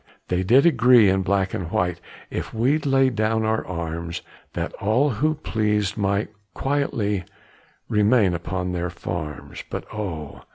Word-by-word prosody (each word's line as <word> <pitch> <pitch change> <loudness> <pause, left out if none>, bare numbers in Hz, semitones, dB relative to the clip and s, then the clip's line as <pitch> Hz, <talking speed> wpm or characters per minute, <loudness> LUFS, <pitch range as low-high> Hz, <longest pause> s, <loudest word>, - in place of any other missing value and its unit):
They 90 0 +1
did 125 - +5
agree 125 - +6
in 95 0 +2
black 95 0 0
and 85 -3 -3
white, 90 -1 -1 0.3
If - - -4
we'd 140 +7 +1
lay 135 -1 +4
down 110 0 0
our 110 0 +1
arms, 85 -1 -5 0.3
That - - -3
all 125 +8 +2
who 155 +8 +1
pleased 105 - 0
might 100 0 0 0.3
quietly 115 -8 0 0.6
Remain 105 -2 +3
upon 90 +2 -3
their 90 0 -2
farms. 85 -4 -6
But - - -5
oh! 85 -8 -5
105 Hz, 140 wpm, -23 LUFS, 90-120 Hz, 0.6 s, agree